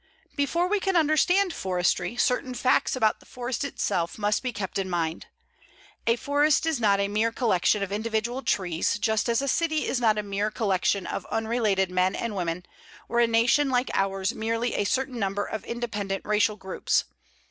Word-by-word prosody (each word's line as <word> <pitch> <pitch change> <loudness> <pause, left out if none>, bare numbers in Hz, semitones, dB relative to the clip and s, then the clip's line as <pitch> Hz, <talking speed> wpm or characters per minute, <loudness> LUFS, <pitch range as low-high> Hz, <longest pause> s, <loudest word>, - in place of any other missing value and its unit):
Before 335 +5 +1
we 410 +2 +1
can 385 -1 -1
understand 345 +4 +3
forestry, 180 +3 -1
certain 250 0 0
facts 255 +2 +2
about 220 -4 +2
the - - -20
forest 250 +1 -4
itself 175 -10 -2
must 210 0 +1
be 255 - -2
kept 200 -3 -4
in 190 -1 -2
mind. 165 -2 -2 0.8
A 230 - +4
forest 290 +4 +2
is 320 -5 0
not 200 -3 +3
a 200 - +1
mere 215 +3 +1
collection 210 -3 +1
of 195 - -5
individual 225 +4 -2
trees, 180 -4 0
just 220 +2 0
as 235 +3 +1
a - - -2
city 315 +2 +1
is 260 - 0
not 220 -2 +3
a 210 - -1
mere 205 +1 -1
collection 200 -2 0
of - - -5
unrelated 220 -5 0
men 185 +1 +1
and 230 -3 -3
women, 175 -1 -3 0.4
or 235 - 0
a 235 - +5
Nation 235 +5 +3
like 250 0 +1
ours 195 0 0
merely 230 +2 -1
a 205 - 0
certain 260 +2 -1
number 200 0 -1
of 215 - -5
independent 210 -5 -4
racial 210 0 +2
groups. 190 -2 -1
220 Hz, 180 wpm, -26 LUFS, 195-250 Hz, 0.8 s, a